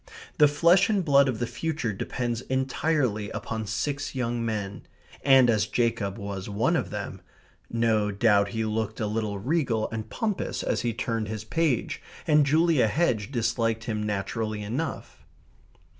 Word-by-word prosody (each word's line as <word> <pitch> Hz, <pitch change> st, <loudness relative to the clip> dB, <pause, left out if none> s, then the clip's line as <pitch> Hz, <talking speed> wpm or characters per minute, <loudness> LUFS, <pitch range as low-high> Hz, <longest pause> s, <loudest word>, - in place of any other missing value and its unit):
The 150 Hz, -, +8 dB
flesh 170 Hz, +8 st, +4 dB
and 200 Hz, -5 st, +1 dB
blood 140 Hz, -2 st, +5 dB
of 125 Hz, -, -2 dB
the 120 Hz, -, -1 dB
future 150 Hz, -4 st, -3 dB
depends 120 Hz, +4 st, -3 dB
entirely 130 Hz, -4 st, 0 dB
upon 110 Hz, -1 st, -4 dB
six 140 Hz, +7 st, -2 dB
young 120 Hz, -2 st, -1 dB
men. 105 Hz, -3 st, -4 dB, 0.4 s
And 135 Hz, -2 st, +6 dB
as 110 Hz, -3 st, +2 dB
Jacob 115 Hz, -4 st, 0 dB
was 100 Hz, -2 st, -5 dB
one 105 Hz, +3 st, +1 dB
of -, -, -1 dB
them, -, -, -6 dB, 0.5 s
no 115 Hz, -2 st, +1 dB
doubt 100 Hz, 0 st, +3 dB
he 110 Hz, +2 st, -2 dB
looked 110 Hz, 0 st, -2 dB
a 110 Hz, -, 0 dB
little 105 Hz, -1 st, -2 dB
regal 125 Hz, -, 0 dB
and 110 Hz, -1 st, -5 dB
pompous 215 Hz, -5 st, -2 dB
as -, -, 0 dB
he 120 Hz, -, 0 dB
turned 115 Hz, -2 st, -2 dB
his 110 Hz, 0 st, -5 dB
page, 145 Hz, +2 st, 0 dB, 0.2 s
and 150 Hz, -2 st, +4 dB
Julia 155 Hz, -4 st, +4 dB
Hedge 120 Hz, -4 st, 0 dB
disliked 115 Hz, -2 st, 0 dB
him 110 Hz, -2 st, -2 dB
naturally 105 Hz, +1 st, -2 dB
enough. 125 Hz, +11 st, -4 dB
115 Hz, 155 wpm, -26 LUFS, 110-140 Hz, 0.5 s, The